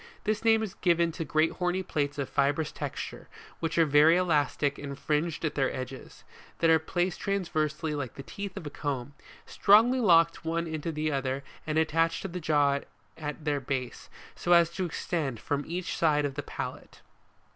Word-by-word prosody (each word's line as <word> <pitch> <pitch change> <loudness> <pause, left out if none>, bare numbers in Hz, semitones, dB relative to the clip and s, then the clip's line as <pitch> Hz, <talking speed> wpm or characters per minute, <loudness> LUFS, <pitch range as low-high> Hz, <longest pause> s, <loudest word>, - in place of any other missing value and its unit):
This 215 +1 -1
name 225 -1 +4
is 210 - -4
given 170 -2 +2
to 165 +1 -4
great 155 +1 +2
horny 180 +1 -1
plates 145 -4 -2
of 140 -2 -2
fibrous 145 +2 +1
texture, - - -6 0.3
which 165 0 -2
are 165 - +6
very 150 +3 +6
elastic 145 -5 +1
and 140 -1 -6
fringed 155 +3 -1
at 150 - -1
their 135 -2 +1
edges, 130 0 -8 0.3
that 165 -1 +3
are 160 - +6
placed 175 +2 -1
transversely 160 -5 -1
like 140 -5 -4
the 135 - -8
teeth 200 +4 -7
of - - -6
a 145 - -5
comb, 140 -2 -4 0.3
strongly 230 +6 +5
locked 165 -7 +4
one 165 +1 -1
into 160 0 -3
the 155 0 -1
other 135 -1 -2 0.2
and 155 0 0
attached 165 +1 +1
to - - -2
the 180 0 -5
jaw 145 -3 +2 0.4
at 150 0 -6
their 145 -2 +1
base, 130 -2 -4 0.3
so 175 - +2
as 170 -1 +5
to 185 +2 -2
extend 155 -7 -3
from 145 +4 -2
each 175 +2 -3
side 150 -3 +2
of 140 - -2
the 145 - -4
palate, - - -6
(Plate - - -22
6 - - -19
fig. - - -34
160 Hz, 195 wpm, -29 LUFS, 145-170 Hz, 0.4 s, are